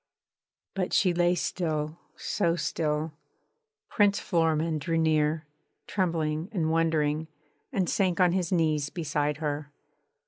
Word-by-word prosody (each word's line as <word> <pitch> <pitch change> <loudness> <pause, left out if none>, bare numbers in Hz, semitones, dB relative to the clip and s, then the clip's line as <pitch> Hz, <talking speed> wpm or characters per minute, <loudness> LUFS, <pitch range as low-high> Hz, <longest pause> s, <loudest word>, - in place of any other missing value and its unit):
But 190 -2 -2
she 185 -3 +4
lay 175 +1 +3
still, 160 -2 -2 0.2
so 170 -5 0
still!... 155 -1 -1 0.7
Prince 205 -2 +3
Florimond 160 -2 +1
drew 165 +3 0
near, 155 -1 +2 0.4
trembling 165 -3 -1
and 165 -7 0
wondering, 160 -1 +1 0.4
and 195 -8 0
sank 185 -2 +1
on 180 -1 +5
his 180 -1 -1
knees 155 -4 +1
beside 150 -3 -1
her. 150 -2 -3
160 Hz, 115 wpm, -28 LUFS, 155-175 Hz, 0.7 s, on